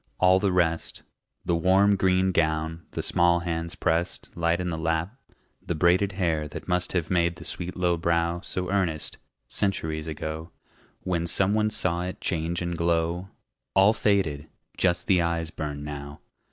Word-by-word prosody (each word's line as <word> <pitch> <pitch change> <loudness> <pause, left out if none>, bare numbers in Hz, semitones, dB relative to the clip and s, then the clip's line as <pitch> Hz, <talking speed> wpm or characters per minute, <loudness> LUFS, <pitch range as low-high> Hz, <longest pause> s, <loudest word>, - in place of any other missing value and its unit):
All 95 0 +5
the 100 -1 +1
rest 85 -2 0 0.4
The 85 - +1
warm 95 +4 +4
green 95 -1 +2
gown, 80 -1 -1
the - - -4
small 85 0 +3
hands 85 0 -3
pressed 85 0 -1
Light 85 0 +1
in 90 -1 -2
the 80 - -3
lap, 80 +6 -1 0.5
the 85 - -3
braided 90 +4 +3
hair 80 -5 0
That 75 - -8
must 90 -1 0
have 85 -2 -1
made 85 -1 +2
the - - -11
sweet 90 +1 -2
low 90 -1 +1
brow 85 +1 0
So 90 -1 -3
earnest, 90 -6 -1 0.3
centuries 80 -6 -1
ago, 80 +1 -5 0.5
When 85 -2 -1
some 95 +3 +3
one 110 0 +2
saw 90 -5 +1
it 90 +1 -5
change 85 0 -1
and 85 0 -2
glow 85 +2 0 0.5
All 95 +3 +6
faded! 90 -9 0 0.3
Just 90 -1 +1
the 90 -3 +3
eyes 85 -1 -1
burn 75 -3 -5
now. 70 -1 -7
85 Hz, 165 wpm, -26 LUFS, 80-95 Hz, 0.5 s, All